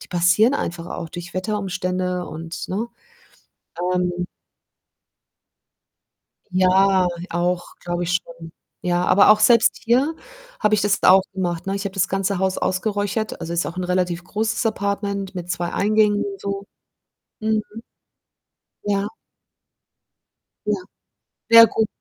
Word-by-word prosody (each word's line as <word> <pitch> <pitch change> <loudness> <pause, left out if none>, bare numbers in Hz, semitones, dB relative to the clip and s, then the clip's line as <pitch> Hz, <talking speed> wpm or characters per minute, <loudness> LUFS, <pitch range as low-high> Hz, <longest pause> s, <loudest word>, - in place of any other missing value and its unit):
die - - -11
passieren 185 +8 +3
einfach 170 -9 -3
auch 175 -1 -6
durch 175 +1 -9
Wetterumstände 185 -2 -2
und 165 +1 -7
ne? 205 +5 -2 1.1
Ähm 180 0 -1 2.2
Ja, 185 0 +4 0.2
auch 175 +1 -1
glaube 175 0 -2
ich 175 - -2
schon. 165 -1 -12 0.3
Ja, 175 0 0
aber 195 +3 +6
auch 215 0 +6
selbst 230 +1 +5
hier 260 +7 +2 0.5
habe 210 0 +3
ich 215 - +2
das 205 0 +1
jetzt - - -6
auch 190 +1 +7
gemacht, 175 -3 -2
ne? 195 - -1
Ich 200 0 -3
habe 200 - -3
das 195 -2 +1
ganze 195 0 -1
Haus 190 0 0
ausgeräuchert, 205 +2 -1
also, 165 - -5
ist 170 0 0
auch 170 - -6
'n 185 - -2
relativ 180 -1 0
großes 220 +5 -1
Apartment 200 -2 -2
mit 180 -1 -6
2 175 0 -2
Eingängen 210 0 +2
und 195 -1 -6
so. 200 0 -4 0.7
Mhm. 220 0 +1 1.2
Ja. 200 0 0 1.6
Ja. - - +2 0.8
Ja 230 0 +10
gut. 220 -1 0
190 Hz, 135 wpm, -22 LUFS, 180-205 Hz, 2.2 s, Ja